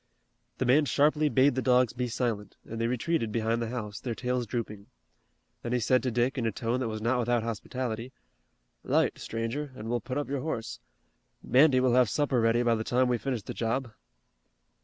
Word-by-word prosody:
The -, -, -1 dB
man 140 Hz, +5 st, +4 dB
sharply 150 Hz, +4 st, +3 dB
bade 135 Hz, 0 st, +4 dB
the 130 Hz, -, -1 dB
dogs 125 Hz, -2 st, +3 dB
be 125 Hz, +1 st, -2 dB
silent 115 Hz, -3 st, -3 dB
and 115 Hz, +1 st, -5 dB
they 115 Hz, -, +1 dB
retreated 125 Hz, 0 st, -1 dB
behind 115 Hz, +1 st, 0 dB
the 115 Hz, -, -2 dB
house, 110 Hz, -3 st, -5 dB
their 120 Hz, -2 st, -4 dB
tails 125 Hz, 0 st, -2 dB
drooping. 105 Hz, -3 st, -5 dB, 0.7 s
Then 120 Hz, -, -3 dB
he 125 Hz, -, +2 dB
said 125 Hz, +3 st, +3 dB
to 130 Hz, -, -1 dB
Dick 120 Hz, +3 st, 0 dB
in 115 Hz, -, 0 dB
a -, -, 0 dB
tone 120 Hz, +2 st, -2 dB
that 130 Hz, -, -1 dB
was 110 Hz, -1 st, -5 dB
not 125 Hz, +2 st, +2 dB
without 120 Hz, -1 st, +1 dB
hospitality: 115 Hz, +1 st, -4 dB, 0.7 s
"'Light, -, -, +1 dB
stranger, 115 Hz, +6 st, -4 dB
an' 110 Hz, -1 st, -7 dB
we'll 120 Hz, -1 st, 0 dB
put 130 Hz, +5 st, -4 dB
up 145 Hz, -, -2 dB
your 140 Hz, -1 st, -2 dB
horse. 125 Hz, -7 st, -4 dB, 0.6 s
Mandy 135 Hz, 0 st, +5 dB
will 130 Hz, -1 st, +3 dB
have 125 Hz, -3 st, +4 dB
supper 140 Hz, -3 st, +1 dB
ready 115 Hz, +1 st, +3 dB
by 120 Hz, -1 st, +3 dB
the 110 Hz, -1 st, -1 dB
time 125 Hz, +2 st, +2 dB
we 120 Hz, -1 st, +1 dB
finish 125 Hz, -2 st, -3 dB
the -, -, -6 dB
job." 120 Hz, +1 st, -2 dB
120 Hz, 200 wpm, -28 LUFS, 115-130 Hz, 0.7 s, Mandy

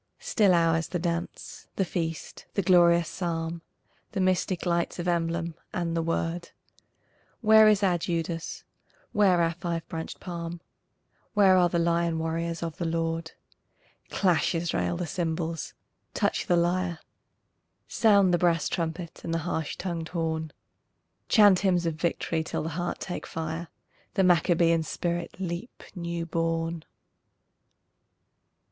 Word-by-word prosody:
Still 200 Hz, -5 st, +3 dB
ours 165 Hz, -1 st, +2 dB
the 180 Hz, -, -2 dB
dance, 170 Hz, 0 st, -4 dB
the 195 Hz, -, +1 dB
feast, 165 Hz, -2 st, -4 dB
the 200 Hz, -, +1 dB
glorious 170 Hz, -2 st, +5 dB
Psalm, 165 Hz, -2 st, -3 dB, 0.5 s
The 200 Hz, -, -2 dB
mystic 185 Hz, -1 st, +1 dB
lights 170 Hz, -1 st, 0 dB
of 175 Hz, 0 st, -3 dB
emblem, 170 Hz, -1 st, 0 dB, 0.2 s
and 170 Hz, -2 st, -1 dB
the 165 Hz, -, +1 dB
Word. 165 Hz, +1 st, -2 dB, 0.9 s
Where 220 Hz, -1 st, +7 dB
is 210 Hz, -1 st, +4 dB
our 180 Hz, -3 st, +3 dB
Judas? 165 Hz, -1 st, -3 dB, 0.5 s
Where 195 Hz, -4 st, +4 dB
our 165 Hz, 0 st, +1 dB
five 170 Hz, -1 st, -4 dB
branched 160 Hz, 0 st, -5 dB
palm? 170 Hz, -1 st, -6 dB, 0.8 s
Where 195 Hz, -2 st, +6 dB
are 180 Hz, -1 st, +4 dB
the 170 Hz, -, 0 dB
lion 170 Hz, 0 st, +1 dB
warriors 165 Hz, +1 st, -2 dB
of 165 Hz, -2 st, -4 dB
the 170 Hz, -, -2 dB
Lord? 165 Hz, 0 st, -2 dB, 0.8 s
Clash, 180 Hz, -3 st, +2 dB
Israel, 90 Hz, -, -1 dB
the -, -, -2 dB
cymbals, 165 Hz, -1 st, -3 dB, 0.4 s
touch -, -, 0 dB
the 175 Hz, -, +3 dB
lyre, 175 Hz, 0 st, +1 dB, 0.9 s
Sound 200 Hz, -5 st, +4 dB
the 175 Hz, -, +3 dB
brass 170 Hz, -2 st, +2 dB
trumpet 165 Hz, 0 st, -4 dB
and 165 Hz, -, -4 dB
the 165 Hz, -, +1 dB
harsh 160 Hz, -3 st, -2 dB
tongued 170 Hz, -3 st, -3 dB
horn, 160 Hz, -2 st, -2 dB, 0.8 s
Chant 205 Hz, -5 st, +6 dB
hymns 180 Hz, -3 st, +2 dB
of 165 Hz, -, 0 dB
victory 165 Hz, 0 st, -1 dB
till -, -, -3 dB
the 160 Hz, -, -3 dB
heart 175 Hz, +2 st, -3 dB
take 180 Hz, -, -5 dB
fire, 160 Hz, +1 st, -4 dB, 0.5 s
The 190 Hz, -, +3 dB
Maccabean 170 Hz, -2 st, +4 dB
spirit 170 Hz, +3 st, -3 dB
leap 180 Hz, +5 st, -5 dB
new 170 Hz, -1 st, -3 dB
born! 165 Hz, 0 st, -1 dB
170 Hz, 135 wpm, -27 LUFS, 165-180 Hz, 0.9 s, Where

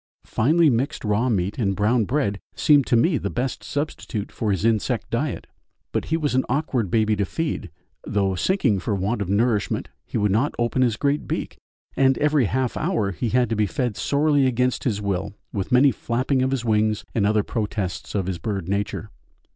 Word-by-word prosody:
Finely 160 Hz, +8 st, +3 dB
mixed 135 Hz, +1 st, 0 dB
raw 105 Hz, +4 st, +1 dB
meat 100 Hz, -1 st, -1 dB
and 100 Hz, -4 st, +1 dB
brown 110 Hz, +3 st, +2 dB
bread 115 Hz, -6 st, 0 dB, 0.2 s
seemed 145 Hz, -3 st, +4 dB
to 125 Hz, -, +3 dB
me 145 Hz, +5 st, +3 dB
the 100 Hz, -, -3 dB
best 125 Hz, +4 st, -3 dB
substitute 145 Hz, -7 st, -4 dB
for 110 Hz, -, -2 dB
his 100 Hz, +1 st, 0 dB
insect 115 Hz, -2 st, +1 dB
diet -, -, -2 dB, 0.5 s
but -, -, -1 dB
he 160 Hz, -, 0 dB
was 150 Hz, -4 st, -1 dB
an 130 Hz, 0 st, +3 dB
awkward 130 Hz, -, 0 dB
baby 110 Hz, +1 st, +2 dB
to 100 Hz, -, 0 dB
feed 150 Hz, -, -3 dB, 0.3 s
though 100 Hz, -2 st, 0 dB
sinking 115 Hz, -, +1 dB
for 100 Hz, +3 st, -1 dB
want 100 Hz, +4 st, -1 dB
of 95 Hz, -, -3 dB
nourishment 105 Hz, +1 st, +1 dB
he -, -, -4 dB
would 105 Hz, -1 st, +2 dB
not 115 Hz, +9 st, +1 dB
open 120 Hz, +2 st, 0 dB
his 120 Hz, -4 st, +2 dB
great 145 Hz, +1 st, 0 dB
beak, -, -, -4 dB, 0.4 s
and 135 Hz, -1 st, +3 dB
every 150 Hz, -3 st, +3 dB
half 130 Hz, +4 st, -1 dB
hour 150 Hz, -, 0 dB
he 115 Hz, +5 st, -2 dB
had 125 Hz, +2 st, +2 dB
to 115 Hz, -, -1 dB
be 105 Hz, -1 st, +1 dB
fed 120 Hz, +1 st, -2 dB
sorely 145 Hz, +1 st, +2 dB
against 125 Hz, 0 st, 0 dB
his 110 Hz, -6 st, 0 dB
will 100 Hz, -1 st, -2 dB, 0.2 s
with 100 Hz, -3 st, -3 dB
many 130 Hz, +3 st, +6 dB
flapping 130 Hz, +3 st, -1 dB
of 130 Hz, -, +2 dB
his 130 Hz, -3 st, -2 dB
wings 110 Hz, -1 st, +1 dB
and 105 Hz, -3 st, +2 dB
other 105 Hz, 0 st, +2 dB
protests 105 Hz, -6 st, -3 dB
of 95 Hz, -3 st, 0 dB
his 90 Hz, -2 st, -3 dB
bird 95 Hz, -1 st, -3 dB
nature. 100 Hz, +2 st, -2 dB
115 Hz, 195 wpm, -23 LUFS, 100-135 Hz, 0.5 s, many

